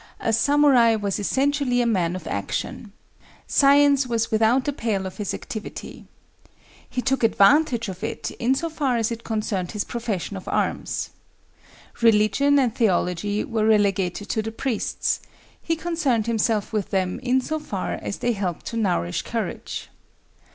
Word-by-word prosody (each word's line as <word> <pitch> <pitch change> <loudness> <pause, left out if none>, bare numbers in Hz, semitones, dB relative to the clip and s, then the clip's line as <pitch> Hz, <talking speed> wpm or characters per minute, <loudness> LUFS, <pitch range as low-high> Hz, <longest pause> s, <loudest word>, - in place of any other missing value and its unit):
A 225 - 0
samurai 265 -3 +4
was 205 -2 -2
essentially 270 +3 +1
a 240 - +2
man 180 -6 +1
of 180 -3 -7
action. 150 - -4 0.5
Science 280 -1 +4
was 230 -2 -1
without 225 +4 +3
the 290 - -1
pale 215 -7 -2
of 190 - -7
his 210 -3 -3
activity. 215 -2 -7 0.8
He 250 - -3
took 270 -2 0
advantage 235 +3 +4
of 185 -1 -7
it - - -4
in 250 +3 +2
so 330 - -2
far 285 -6 0
as 225 0 0
it 230 0 -5
concerned 210 -5 -2
his 210 -1 -1
profession 220 -5 -4
of 190 - -8
arms. - - -2 0.9
Religion 230 +6 +4
and 250 -5 +2
theology 205 -2 +1
were 220 -1 0
relegated 200 -2 +1
to 220 - 0
the 225 +1 -5
priests; 230 0 -1 0.4
he 330 - -1
concerned 310 -10 0
himself 225 -2 0
with 210 -3 -1
them 185 +1 -1
in 255 0 +2
so 310 +4 -3
far 195 -10 -4
as - - -4
they 240 - 0
helped 190 -5 -3
to 230 - -4
nourish 175 - 0
courage. - - -5
225 Hz, 155 wpm, -23 LUFS, 200-260 Hz, 0.9 s, samurai